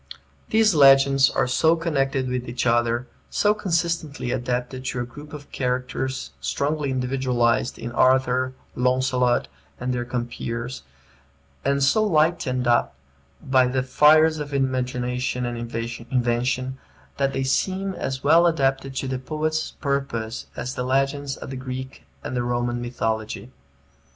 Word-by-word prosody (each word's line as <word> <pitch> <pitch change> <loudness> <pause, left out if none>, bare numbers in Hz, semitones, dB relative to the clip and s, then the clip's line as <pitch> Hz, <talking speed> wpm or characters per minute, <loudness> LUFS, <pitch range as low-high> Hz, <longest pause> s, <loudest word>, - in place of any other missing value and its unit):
These 220 -2 +4
legends 135 -2 +6
are - - +1
so 160 +6 +3
connected 135 -5 0
with 125 -1 -3
each 120 +1 -2
other, 120 0 +2 0.2
so 210 0 +3
consistently 170 - -1
adapted 125 +1 -2
to 125 - -2
a 120 - -1
group 145 +5 -12
of 145 -2 -10
characters 130 +1 -2
strongly 145 0 -1
individualized 125 -2 0
in 120 +1 -6
Arthur, 130 +1 +2 0.2
Launcelot, 125 -1 +2 0.3
and 125 0 -2
their 120 -1 -1
compeers, 120 0 -4 0.8
and 140 0 +1
so 215 +11 +4
lighted 155 -8 +1
up 120 - +2 0.5
by 130 -1 +4
the 130 +1 0
fires 155 +4 +5
of 145 -1 -4
imagination 125 -1 -1
and 120 0 -3
invention, 120 +2 -2 0.4
that 135 -1 +1
they 135 -1 -1
seem 190 +8 0
as 135 -6 -4
well 165 +4 +6
adapted 135 -4 0
to 135 - -2
the 130 -1 -2
poet's 155 +3 -2
purpose 135 -6 -3
as 125 - -4
the - - -4
legends 135 +2 0
of - - -8
the - - -5
Greek 130 0 -7 0.2
and - - -4
Roman 120 0 -1
mythology. 110 -2 -3
130 Hz, 135 wpm, -24 LUFS, 125-140 Hz, 0.8 s, legends